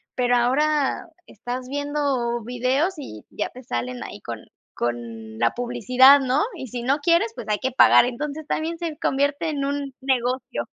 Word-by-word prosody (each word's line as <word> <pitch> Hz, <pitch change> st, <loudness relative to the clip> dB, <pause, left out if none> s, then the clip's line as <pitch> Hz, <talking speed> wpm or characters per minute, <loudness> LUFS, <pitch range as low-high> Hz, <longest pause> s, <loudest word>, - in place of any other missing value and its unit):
pero 245 Hz, -1 st, +2 dB
ahora 280 Hz, +5 st, +1 dB, 0.2 s
estás 245 Hz, +4 st, -6 dB
viendo 280 Hz, -4 st, -1 dB
videos 255 Hz, -, 0 dB
y 110 Hz, -, -9 dB
ya 210 Hz, -, -3 dB
te 255 Hz, -, -13 dB
salen 125 Hz, -, -4 dB
ahí -, -, -8 dB
con -, -, -7 dB, 0.3 s
con 115 Hz, -2 st, -4 dB
la 115 Hz, 0 st, +2 dB
publicidad, 245 Hz, +3 st, +5 dB
¿no?, 265 Hz, +1 st, +1 dB
y 290 Hz, -, -7 dB
si 245 Hz, +1 st, -5 dB
no 265 Hz, +4 st, +1 dB
quieres, 340 Hz, +9 st, +2 dB
pues -, -, -8 dB
hay 210 Hz, -1 st, 0 dB
que 260 Hz, -, -1 dB
pagar, 250 Hz, -, +6 dB
entonces, 290 Hz, +5 st, -5 dB
también 330 Hz, +2 st, -2 dB
se 330 Hz, -3 st, -4 dB
convierte 285 Hz, +3 st, 0 dB
en 280 Hz, -2 st, -2 dB
un 280 Hz, -1 st, -3 dB
negocio. 255 Hz, -1 st, -1 dB
260 Hz, 165 wpm, -23 LUFS, 240-285 Hz, 0.3 s, pagar